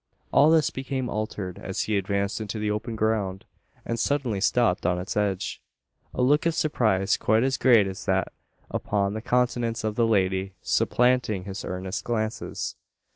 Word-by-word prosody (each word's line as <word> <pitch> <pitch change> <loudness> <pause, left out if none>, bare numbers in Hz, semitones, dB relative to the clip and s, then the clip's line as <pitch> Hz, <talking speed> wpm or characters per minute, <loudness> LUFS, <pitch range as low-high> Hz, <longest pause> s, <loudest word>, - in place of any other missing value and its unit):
All 145 +3 +6
this 160 -3 +4
became 130 -1 -3
altered, 105 -4 -4
as 95 - -3
he 110 - -1
advanced 100 +2 -1
into 110 0 -4
the 105 0 -1
open 105 +2 -3
ground, 105 -3 -1 0.4
and 115 0 -2
suddenly 125 -7 0
stopped 110 -4 +2
on 90 0 +1
its 90 +2 -4
edge; 100 -3 -1 0.5
a 125 - -1
look 145 +5 +3
of 165 - 0
surprise 105 -12 +1
quite 110 +2 +2
as 135 0 +1
great 120 -6 +5
as 95 0 -6
that 95 -1 +1 0.4
upon 100 -1 0
the 110 - -4
countenance 120 -2 0
of 110 -1 -1
the 115 +1 +2
lady, 95 -2 +1
supplanting 125 -6 +2
his 95 0 -6
earnest 95 +1 -4
glances. 110 -2 -3
110 Hz, 165 wpm, -26 LUFS, 95-125 Hz, 0.5 s, All